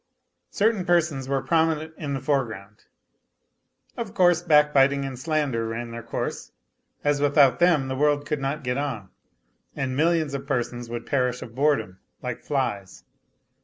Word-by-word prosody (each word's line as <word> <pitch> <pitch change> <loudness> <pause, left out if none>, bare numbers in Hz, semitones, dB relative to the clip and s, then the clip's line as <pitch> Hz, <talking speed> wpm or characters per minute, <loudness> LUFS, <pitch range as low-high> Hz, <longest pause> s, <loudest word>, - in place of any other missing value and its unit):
Certain 215 -2 +1
persons 165 -7 +1
were 135 -1 0
prominent 160 +1 +1
in 145 -3 -4
the - - -2
foreground. 115 -7 -3 1.1
Of 225 -2 -6
course 175 -3 +4
backbiting 145 -4 +4
and 130 -2 -6
slander 140 -6 -1
ran 115 +1 -5
their 115 0 -6
course, 115 0 -5 0.5
as 145 -1 +1
without 145 -3 +4
them 170 -6 +3
the 130 - -3
world 145 +1 +1
could 150 0 -2
not 140 +2 -2
get 125 +1 -1
on, 120 -10 -4 0.7
and 130 -1 -2
millions 160 -1 +1
of 140 0 -5
persons 120 -2 -2
would 120 0 -5
perish 125 -2 0
of 115 - -11
boredom, 130 -9 0 0.2
like 125 -2 -5
flies. 115 -9 -3
140 Hz, 150 wpm, -25 LUFS, 125-150 Hz, 1.1 s, course